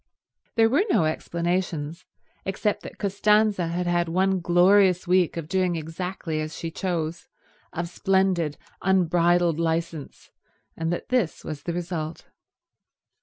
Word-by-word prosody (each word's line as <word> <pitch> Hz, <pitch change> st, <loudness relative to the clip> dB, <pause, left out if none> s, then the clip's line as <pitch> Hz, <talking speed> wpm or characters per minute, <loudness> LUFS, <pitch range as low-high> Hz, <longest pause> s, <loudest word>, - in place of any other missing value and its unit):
There 225 Hz, -1 st, +5 dB
were 275 Hz, -, +3 dB
no 170 Hz, -, +3 dB
explanations, 170 Hz, -1 st, -2 dB, 0.4 s
except 200 Hz, +2 st, -1 dB
that -, -, -10 dB
Costanza 205 Hz, -1 st, +2 dB
had 175 Hz, +2 st, -2 dB
had 175 Hz, -1 st, +1 dB
one 190 Hz, +2 st, +2 dB
glorious 180 Hz, +2 st, +4 dB
week 180 Hz, -2 st, +2 dB
of 165 Hz, -2 st, -4 dB
doing 185 Hz, -1 st, +1 dB
exactly 165 Hz, 0 st, -4 dB
as 155 Hz, +1 st, -5 dB
she 165 Hz, -, -4 dB
chose, 170 Hz, -2 st, -3 dB, 0.4 s
of 170 Hz, +1 st, -3 dB
splendid 180 Hz, -4 st, +1 dB, 0.2 s
unbridled 175 Hz, -2 st, +3 dB
licence, 165 Hz, -2 st, -3 dB, 0.4 s
and 165 Hz, +1 st, -2 dB
that 175 Hz, -, -4 dB
this 245 Hz, -10 st, 0 dB
was 150 Hz, -2 st, -6 dB
the 170 Hz, -, -3 dB
result. 165 Hz, -2 st, -4 dB
175 Hz, 125 wpm, -25 LUFS, 165-190 Hz, 0.4 s, There